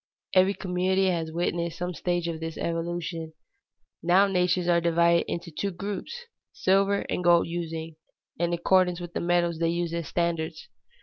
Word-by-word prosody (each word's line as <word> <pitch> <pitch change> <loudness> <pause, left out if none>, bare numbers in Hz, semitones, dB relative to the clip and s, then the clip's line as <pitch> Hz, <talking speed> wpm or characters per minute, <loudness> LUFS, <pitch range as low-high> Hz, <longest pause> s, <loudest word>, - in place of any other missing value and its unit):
Every 190 +1 +4
community 185 +1 +1
has 165 -2 -2
witnessed 170 0 -2
some 180 +1 -3
stage 175 +1 -1
of 165 -1 -3
this 165 -1 -5
evolution. 165 -1 -3 0.7
Now 180 +4 +5
nations 180 -2 +1
are 170 -1 +4
divided 170 0 +3
into 170 0 -4
two 180 +6 -3
great 175 - -11
groups, 210 - -5 0.3
silver 195 +1 +2
and 180 - -2
gold 175 -1 +5
using, 165 -2 -5 0.4
in 170 0 +1
accordance 180 +1 +2
with 175 -1 -8
the - - -2
metals 175 -1 +1
they 165 0 +2
use 170 0 -1
as 170 -2 -3
standards. 165 -2 -2
175 Hz, 165 wpm, -27 LUFS, 165-180 Hz, 0.7 s, Now